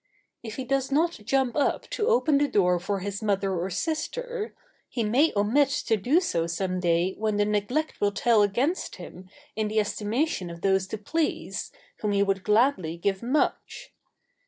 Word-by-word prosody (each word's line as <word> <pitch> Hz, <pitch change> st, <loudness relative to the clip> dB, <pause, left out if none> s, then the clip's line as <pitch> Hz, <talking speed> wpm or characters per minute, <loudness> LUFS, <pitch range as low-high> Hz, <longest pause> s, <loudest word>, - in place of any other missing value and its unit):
If 225 Hz, -2 st, -7 dB
he 265 Hz, -, -4 dB
does 270 Hz, +1 st, -1 dB
not 330 Hz, +2 st, +1 dB
jump 265 Hz, +1 st, +1 dB
up 290 Hz, -, 0 dB
to 425 Hz, -, -1 dB
open 320 Hz, -, +3 dB
the 290 Hz, -, +2 dB
door 180 Hz, -7 st, +2 dB
for 195 Hz, +2 st, -2 dB
his 200 Hz, +2 st, -4 dB
mother 200 Hz, -2 st, 0 dB
or 180 Hz, +1 st, -2 dB
sister, 430 Hz, -, -3 dB, 0.3 s
he 235 Hz, -, -2 dB
may 255 Hz, +9 st, +3 dB
omit 235 Hz, +8 st, +3 dB, 0.2 s
to 225 Hz, -, +3 dB
do 250 Hz, -, +3 dB
so 170 Hz, -, -1 dB
some 185 Hz, +2 st, -2 dB
day 175 Hz, +1 st, +1 dB
when 215 Hz, -1 st, 0 dB
the 205 Hz, -, +3 dB
neglect 210 Hz, +9 st, -1 dB
will 205 Hz, 0 st, +3 dB
tell 225 Hz, +1 st, +3 dB
against 245 Hz, -, 0 dB
him 185 Hz, +1 st, -11 dB, 0.3 s
in 215 Hz, -1 st, 0 dB
the 215 Hz, +1 st, +1 dB
estimation 210 Hz, -, -1 dB
of 170 Hz, 0 st, -9 dB
those 190 Hz, -1 st, +2 dB
to 220 Hz, -, -4 dB
please 305 Hz, +10 st, -2 dB, 0.3 s
whom 210 Hz, -2 st, -1 dB
he 200 Hz, 0 st, +3 dB
would 195 Hz, -1 st, -1 dB
gladly 210 Hz, -, +2 dB
give 190 Hz, +2 st, -1 dB
much. 300 Hz, -, -1 dB
210 Hz, 180 wpm, -26 LUFS, 195-280 Hz, 0.3 s, open